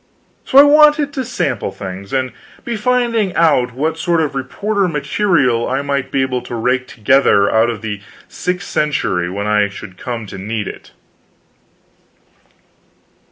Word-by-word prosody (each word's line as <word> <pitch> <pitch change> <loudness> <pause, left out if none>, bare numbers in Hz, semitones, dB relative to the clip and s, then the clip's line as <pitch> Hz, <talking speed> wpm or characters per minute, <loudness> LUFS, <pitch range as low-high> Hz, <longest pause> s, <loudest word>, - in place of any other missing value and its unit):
So 265 - +1
I 280 - +11
wanted 295 0 +5
to 265 -4 -2
sample 175 - -2
things, 95 0 -8
and 130 -1 -1 0.3
be 235 - -2
finding 230 -4 0
out 130 -7 +2
what 160 +4 -2
sort 170 0 +1
of 155 -3 -1
reporter 195 +9 -1
material 145 - +1
I 135 +2 -1
might 140 -2 -2
be 135 - +1
able 130 -1 -2
to 120 0 -7
rake 125 +3 0
together 110 -3 +3
out 110 +1 +3
of 115 -2 -5
the 105 -2 -4 0.3
sixth 180 0 -4
century 140 -12 -1
when 100 +3 -4
I 105 -1 +2
should 95 -1 -11
come 120 -3 -5
to 100 -2 -9
need 105 +1 -3
it. - - -9
130 Hz, 155 wpm, -17 LUFS, 110-180 Hz, 0.3 s, I